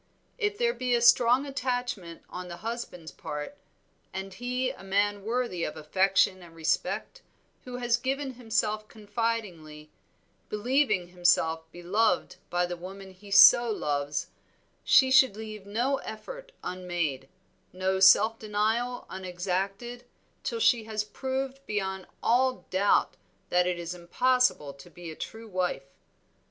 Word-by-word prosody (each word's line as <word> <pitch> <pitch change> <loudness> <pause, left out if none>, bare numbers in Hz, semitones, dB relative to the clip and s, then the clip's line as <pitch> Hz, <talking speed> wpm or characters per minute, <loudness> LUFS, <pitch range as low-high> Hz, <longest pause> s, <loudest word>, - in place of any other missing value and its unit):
If 415 -2 0
there 475 0 +2
be 250 - 0
a - - +3
strong 245 +2 +5
attachment 245 -10 -3
on 180 0 -7
the 170 -1 -7
husband's 225 -8 -5
part, 150 - -6 0.6
and 190 0 -6
he 250 +4 -2
a - - -13
man 200 +1 0
worthy 230 -6 -1
of 155 - -4
affection 185 +4 +2
and 170 -2 -14
respect, 165 - -2 0.4
who 250 -1 -6
has 240 -1 +1
given 270 +2 -2
himself 215 -3 -1
confidingly, 205 -9 -4 0.6
believing 215 -4 +1
himself 165 -2 +1
beloved 190 +6 0
by 175 0 +1
the 175 0 -4
woman 190 +2 -9
he 195 +2 -15
so 200 +5 +8
loves, 145 -7 -2 0.5
she 260 -1 +5
should 260 -5 +6
leave 215 -2 -8
no 245 +7 0
effort - - -8
unmade, 175 -7 -3 0.4
no 190 +1 -1
self 210 +4 +6
denial 220 +4 -1
unexacted, 190 +6 -4 0.4
till 465 - -3
she 240 - +3
has 215 -1 -2
proved 265 +5 -4
beyond 190 -2 -3 0.2
all 255 +2 +2
doubt 195 +2 +2 0.3
that 180 0 +3
it 180 -1 -1
is 170 0 -5
impossible 180 - +1
to 135 0 -14
be 175 -2 -9
a - - -9
true 225 +6 -8
wife. 180 -8 -2
205 Hz, 135 wpm, -28 LUFS, 180-245 Hz, 0.6 s, so